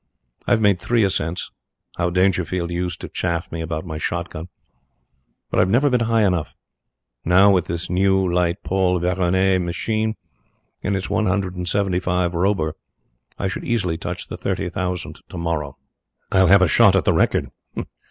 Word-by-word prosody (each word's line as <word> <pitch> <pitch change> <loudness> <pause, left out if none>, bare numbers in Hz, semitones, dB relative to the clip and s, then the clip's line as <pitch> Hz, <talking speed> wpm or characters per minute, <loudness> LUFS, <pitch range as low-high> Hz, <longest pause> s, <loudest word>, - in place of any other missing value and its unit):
I've 115 -2 +3
made 100 -4 +3
three 120 -2 +2
ascents 90 -3 -1 0.4
how 85 - 0
Dangerfield 90 -1 0
used 90 0 -3
to - - -5
chaff 85 -2 -3
me 85 - -4
about 80 +1 -4
my 80 -3 -5
shot 85 +2 -3
gun 80 +3 -7 1.0
but - - +1
I've 95 - +3
never 130 +7 +3
been 125 - +3
high 115 -1 +3
enough. 90 -5 -1 0.7
Now, 95 +4 +5
with 90 -3 +2
this 85 0 -3
new, 95 +1 +2
light 90 +2 0
Paul 95 -1 +1
Veroner 95 +1 +2
machine 110 +5 -1 0.7
and 100 - -1
its 95 - -3
one 110 +1 +1
hundred 95 -1 -1
and 90 -1 -4
seventy 100 -2 +1
five 90 -1 0
Robur, 85 -3 0 0.6
I - - -1
should 95 - -4
easily 90 -9 -1
touch - - -5
the - - -7
thirty 95 -1 -2
thousand 90 0 -4
tomorrow. 85 -5 -3 0.5
I'll 95 0 +4
have 100 0 +6
a - - +4
shot 100 +2 +5
at 95 - +2
the - - +4
record. - - +1
90 Hz, 170 wpm, -21 LUFS, 85-100 Hz, 1.0 s, have